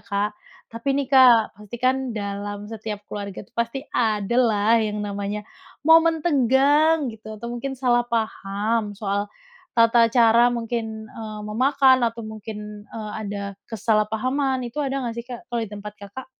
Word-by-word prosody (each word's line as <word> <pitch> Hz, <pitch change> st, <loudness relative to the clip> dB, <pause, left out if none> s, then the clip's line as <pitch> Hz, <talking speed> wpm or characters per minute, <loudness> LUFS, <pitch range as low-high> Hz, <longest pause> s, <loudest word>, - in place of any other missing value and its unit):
Kak, 200 Hz, +1 st, -1 dB, 0.4 s
tapi 230 Hz, +4 st, -5 dB
nih 275 Hz, -, -1 dB
Kak 245 Hz, -4 st, +6 dB
pasti 210 Hz, +2 st, -9 dB
kan 260 Hz, +1 st, +4 dB, 0.2 s
dalam 205 Hz, 0 st, -4 dB
setiap 215 Hz, -2 st, -5 dB
keluarga 200 Hz, -2 st, -6 dB
tuh -, -, -34 dB
pasti 235 Hz, +3 st, -1 dB, 0.2 s
adalah 225 Hz, 0 st, +2 dB
yang 210 Hz, -1 st, -2 dB
namanya 200 Hz, +1 st, -3 dB, 0.5 s
momen 325 Hz, 0 st, +5 dB
tegang 290 Hz, +2 st, +3 dB
gitu, 220 Hz, 0 st, -10 dB
atau 235 Hz, +2 st, -6 dB
mungkin 270 Hz, +3 st, -4 dB
salah 240 Hz, -2 st, +3 dB
paham 220 Hz, -1 st, -1 dB
soal 205 Hz, 0 st, -1 dB, 0.5 s
tata 230 Hz, 0 st, +5 dB
cara 235 Hz, 0 st, +5 dB
mungkin, 225 Hz, -2 st, -4 dB
eee, 215 Hz, -1 st, -7 dB
memakan 260 Hz, +3 st, +4 dB
atau 230 Hz, 0 st, -4 dB
mungkin, 210 Hz, -1 st, -8 dB
eee, 215 Hz, -2 st, -7 dB
ada 200 Hz, -1 st, -4 dB, 0.3 s
kesalahpahaman 235 Hz, +5 st, 0 dB
itu 240 Hz, +5 st, -8 dB
ada 275 Hz, 0 st, -2 dB
nggak 230 Hz, -, -3 dB
sih 235 Hz, -, -5 dB
Kak 240 Hz, -2 st, -8 dB
kalau 240 Hz, -1 st, -1 dB
di 215 Hz, -, -11 dB
tempat 210 Hz, 0 st, -7 dB
Kakak? 205 Hz, +6 st, -9 dB
225 Hz, 150 wpm, -23 LUFS, 210-255 Hz, 0.5 s, Kak